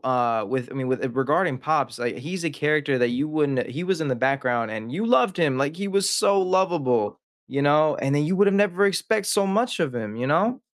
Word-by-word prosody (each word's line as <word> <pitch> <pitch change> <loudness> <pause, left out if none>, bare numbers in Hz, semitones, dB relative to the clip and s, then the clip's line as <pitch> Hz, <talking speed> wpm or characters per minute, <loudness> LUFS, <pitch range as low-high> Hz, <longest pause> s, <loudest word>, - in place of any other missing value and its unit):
uh, 120 -3 +1
with 130 -2 -3
I - - -10
mean, 130 -1 -3
with 130 0 -1
it 130 -2 -4
regarding 135 +2 +1
Pops, 130 -4 -1
like, 120 -1 -3
he's 170 +7 -6
a 165 - 0
character 150 -2 0
that 120 -1 +2
you 130 +5 -1
wouldn't 145 -4 0
e - - -8
he 160 +7 -4
was 185 -2 -1
in 155 - -2
the 130 - -1
background, 125 -3 0
and 110 +2 -7
you 205 +9 -2
loved 235 -4 +3
him, 150 -6 +1
like, 140 +3 -1
he 200 +1 -4
was 195 0 +1
so 200 -1 +3
lovable, 175 - 0 0.3
you 140 +1 -2
know? 150 +1 +3
And 135 +1 -1
then 145 +1 +1
you 185 +5 0
would 205 +1 +4
have 200 - +1
never 200 -1 +2
expect 200 +2 0
so 205 -1 +1
much 225 +4 0
of 150 -7 -1
him 110 -2 -5
you 125 +2 -3
know? 205 - +1
145 Hz, 250 wpm, -23 LUFS, 130-190 Hz, 0.3 s, would